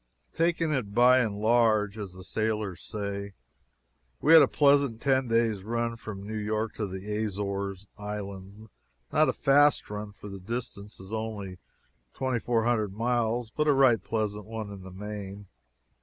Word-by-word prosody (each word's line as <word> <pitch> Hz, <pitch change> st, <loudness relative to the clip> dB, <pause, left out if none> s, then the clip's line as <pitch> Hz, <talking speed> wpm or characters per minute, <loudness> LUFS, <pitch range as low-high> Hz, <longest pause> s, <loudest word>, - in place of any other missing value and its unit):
Taking 165 Hz, -1 st, +1 dB
it 105 Hz, -7 st, -2 dB
"by 125 Hz, +2 st, +6 dB
and 110 Hz, -5 st, 0 dB
large," 110 Hz, -2 st, +3 dB
as 100 Hz, -3 st, -6 dB
the 95 Hz, 0 st, -11 dB
sailors 105 Hz, -3 st, -2 dB
say, 100 Hz, -2 st, -5 dB, 0.9 s
we 160 Hz, -, +4 dB
had 165 Hz, -, +11 dB
a -, -, +6 dB
pleasant 140 Hz, -5 st, +3 dB
ten 130 Hz, 0 st, +2 dB
days' 115 Hz, -4 st, +1 dB
run 115 Hz, +2 st, -1 dB
from 105 Hz, -3 st, -8 dB
New 110 Hz, +1 st, -4 dB
York 110 Hz, +1 st, -2 dB
to 105 Hz, -, -2 dB
the 100 Hz, +3 st, -4 dB
Azores 100 Hz, -1 st, -3 dB
islands 100 Hz, -1 st, -6 dB, 0.6 s
not 155 Hz, 0 st, +4 dB
a -, -, +1 dB
fast 145 Hz, -3 st, +3 dB
run, 105 Hz, 0 st, -5 dB
for 105 Hz, -, -12 dB
the 100 Hz, -1 st, -7 dB
distance 105 Hz, 0 st, -6 dB
is 95 Hz, +3 st, -10 dB
only 105 Hz, -4 st, -4 dB, 0.6 s
twenty 130 Hz, -2 st, -1 dB
four 115 Hz, -1 st, +1 dB
hundred 110 Hz, -5 st, +1 dB
miles, 120 Hz, 0 st, 0 dB
but 150 Hz, +3 st, 0 dB
a 145 Hz, -, +6 dB
right 135 Hz, -4 st, +4 dB
pleasant 105 Hz, -2 st, -2 dB
one 110 Hz, -1 st, -6 dB
in 100 Hz, -2 st, -9 dB
the 95 Hz, -, -10 dB
main. 100 Hz, +1 st, -7 dB
110 Hz, 165 wpm, -28 LUFS, 100-120 Hz, 0.9 s, had